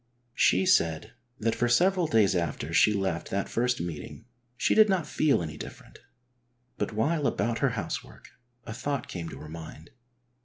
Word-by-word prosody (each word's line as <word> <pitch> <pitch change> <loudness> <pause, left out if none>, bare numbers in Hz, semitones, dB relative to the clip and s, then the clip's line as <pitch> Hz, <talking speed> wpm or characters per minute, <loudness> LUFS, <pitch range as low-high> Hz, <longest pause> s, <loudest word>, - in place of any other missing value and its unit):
She 190 - +3
said 85 - +2 0.3
that 115 +1 +1
for 120 - 0
several 180 +6 +3
days 110 -10 +3
after 85 -2 -2
she 95 +6 +5
left 95 -5 -2
that 100 0 -1
first 125 +1 0
meeting 85 +4 -6 0.3
she - - +2
did 215 -1 +6
not 185 -5 +1
feel 145 - +1
any 75 -2 -6
different, - - -11 0.8
but - - -1
while 145 +7 +1
about 115 -1 -1
her - - +2
housework - - -6 0.4
a 110 - -6
thought 140 +2 -3
came 85 -2 -6
to - - -9
her 75 - -10
mind. 80 0 -10
110 Hz, 165 wpm, -28 LUFS, -, 0.8 s, did